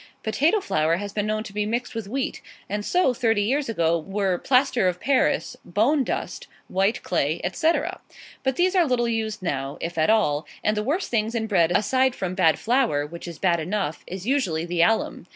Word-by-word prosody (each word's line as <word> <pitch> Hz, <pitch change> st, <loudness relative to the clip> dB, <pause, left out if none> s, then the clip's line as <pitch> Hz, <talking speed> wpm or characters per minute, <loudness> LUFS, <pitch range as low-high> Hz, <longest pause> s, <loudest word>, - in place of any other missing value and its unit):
Potato 300 Hz, -, +2 dB
flour 155 Hz, -, +1 dB
has 200 Hz, +1 st, -6 dB
been 210 Hz, 0 st, -1 dB
known 215 Hz, 0 st, -1 dB
to 200 Hz, -, -10 dB
be 210 Hz, 0 st, 0 dB
mixed 235 Hz, +4 st, -2 dB
with 225 Hz, -3 st, -5 dB
wheat; 265 Hz, +5 st, -3 dB, 0.3 s
and 205 Hz, +1 st, -3 dB
so, 355 Hz, -, +2 dB
thirty 225 Hz, -3 st, +1 dB
years 270 Hz, +5 st, 0 dB
ago, 170 Hz, -5 st, +1 dB
were 195 Hz, +1 st, -1 dB
plaster 255 Hz, -5 st, +2 dB
of 180 Hz, -1 st, -1 dB
Paris, 255 Hz, -, +1 dB
bone 240 Hz, -, +2 dB
dust, -, -, -4 dB, 0.2 s
white 195 Hz, +5 st, 0 dB
clay, 160 Hz, -2 st, 0 dB
etc. 315 Hz, -, 0 dB, 0.4 s
But 265 Hz, -1 st, 0 dB
these 365 Hz, +4 st, +2 dB
are 350 Hz, -4 st, +4 dB
little 245 Hz, -2 st, +1 dB
used 220 Hz, -3 st, -2 dB
now, 135 Hz, -5 st, -3 dB
if 170 Hz, 0 st, -4 dB
at 155 Hz, -, +3 dB
all; 160 Hz, -9 st, +2 dB, 0.2 s
and 215 Hz, -, +2 dB
the 210 Hz, -, 0 dB
worst 300 Hz, -, -2 dB
thing 220 Hz, -2 st, +1 dB
in 225 Hz, -1 st, 0 dB
bread, 175 Hz, -6 st, +2 dB
aside 250 Hz, +7 st, +2 dB
from 185 Hz, -1 st, -3 dB
bad 185 Hz, -4 st, +3 dB
flour, 230 Hz, -, +1 dB
which 170 Hz, +3 st, -9 dB
is 170 Hz, -2 st, -7 dB
bad 175 Hz, -1 st, +2 dB
enough, 175 Hz, -1 st, -3 dB
is 185 Hz, +1 st, -7 dB
usually 195 Hz, -, 0 dB
the 175 Hz, -1 st, 0 dB
alum. 225 Hz, +6 st, +1 dB
210 Hz, 200 wpm, -24 LUFS, 175-250 Hz, 0.4 s, are